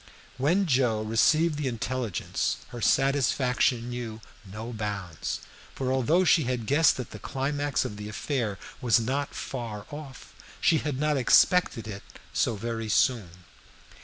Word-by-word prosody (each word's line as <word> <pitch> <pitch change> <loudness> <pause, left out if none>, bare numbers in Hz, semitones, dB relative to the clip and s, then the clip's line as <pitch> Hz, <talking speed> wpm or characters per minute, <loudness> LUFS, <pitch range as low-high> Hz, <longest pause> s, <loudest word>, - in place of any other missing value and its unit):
When 175 +9 +3
Joe 125 -7 +2
received 150 +8 +3
the 145 - -1
intelligence 110 -6 -2
her 120 - -8
satisfaction 130 -2 +2
knew 120 -3 -5 0.2
no 110 +4 -7
bounds, 100 -6 -4 0.3
for 130 -1 -1
although 150 +8 +3
she 160 -3 +4
had 125 -2 -2
guessed 150 +7 +4
that 125 -3 -6
the - - -8
climax 145 +1 -1
of 105 - -5
the 105 0 -6
affair 110 -2 -2 0.2
was 120 -1 +4
not 135 +5 -2
far 115 -5 -5
off, 145 -3 -9 0.3
she 160 - +3
had 145 -4 -3
not 150 -1 +1
expected 135 -1 +4
it 100 -2 -6 0.3
so 115 - +1
very 115 +1 -4
soon. 95 -7 +1
125 Hz, 140 wpm, -27 LUFS, 110-140 Hz, 0.3 s, she